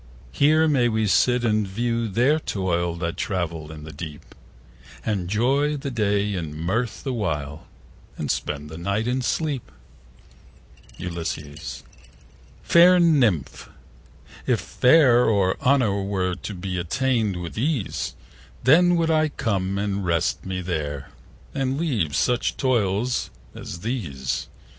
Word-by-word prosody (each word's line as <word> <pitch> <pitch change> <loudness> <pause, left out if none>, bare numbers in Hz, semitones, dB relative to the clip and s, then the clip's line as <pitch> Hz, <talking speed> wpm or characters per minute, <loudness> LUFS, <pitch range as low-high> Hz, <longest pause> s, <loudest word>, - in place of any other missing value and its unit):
Here 155 - +4
may 130 -5 +3
we 110 -1 +1
sit 120 +6 +3
and 110 -2 +1
view 115 +3 -1
their 125 +10 +2
toil 85 - -1
5 85 - -9
That 85 -1 -2
travail 85 -5 -3
in 75 -1 -9
the 80 - -8
deep, 75 0 -9 0.7
And 100 -5 -1
joy 135 +8 +1
the 140 0 -5
day 105 -3 +1
in 80 -5 -4
mirth 105 +6 -2
the 135 - -2
while, 75 - -3 0.5
And - - -1
spend 75 0 -4
the 80 - -7
night 100 +6 -1
in 130 +1 0
sleep. 140 0 -2 1.3
Ulysses.Fair 85 - -1
Nymph, 130 - +2 0.8
if - - +2
fame 125 -3 +4
or 95 -3 +2
honour 125 -7 +2
were 95 -2 -1
To 100 +3 -6
be 90 0 -4
attain'd 110 +2 0
with 85 -1 -6
ease, 130 -2 -2 0.5
10 130 - +7 0.2
Then 175 - +4
would 165 -1 +1
I 155 -1 +3
come 100 -8 -1
and 100 -1 -1
rest 85 +1 0
me 95 -1 -3
there, 75 -6 -4 0.4
And 135 -1 -1
leave 115 - 0
such 125 - +1
toils 120 -1 0 0.2
as 85 +2 -8
these. 80 - -3
105 Hz, 135 wpm, -24 LUFS, 85-125 Hz, 1.3 s, 10